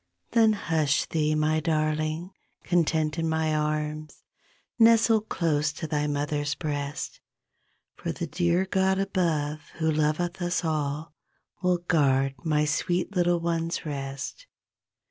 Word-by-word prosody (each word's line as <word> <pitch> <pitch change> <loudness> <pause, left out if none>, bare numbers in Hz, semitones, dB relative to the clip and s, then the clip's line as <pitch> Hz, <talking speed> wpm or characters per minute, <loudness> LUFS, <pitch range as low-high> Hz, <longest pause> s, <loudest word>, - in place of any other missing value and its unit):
Then 225 -2 +5
hush 160 -8 +1
thee 155 -1 0
my 155 +1 +2
darling 155 +2 -1 0.3
Content 160 -2 +1
in 165 0 0
my 160 -1 +1
arms, 150 0 -2 0.6
Nestle 225 -1 +6
close 155 -7 0
to 160 - -5
thy 150 -1 -1
mother's 145 0 -1
breast; 145 -2 -4 0.8
For - - -3
the 170 - -4
dear 175 +3 +1
God 190 0 +1
above 160 -6 -1
Who 160 -1 +1
loveth 155 +4 0
us 175 0 0
all 150 0 -2 0.5
Will 180 -1 +2
guard 135 -6 +2
my 150 -2 +2
sweet 175 +5 -1
little 175 -1 +3
ones 165 0 -2
rest. 140 - -5
155 Hz, 125 wpm, -27 LUFS, 150-175 Hz, 0.8 s, Nestle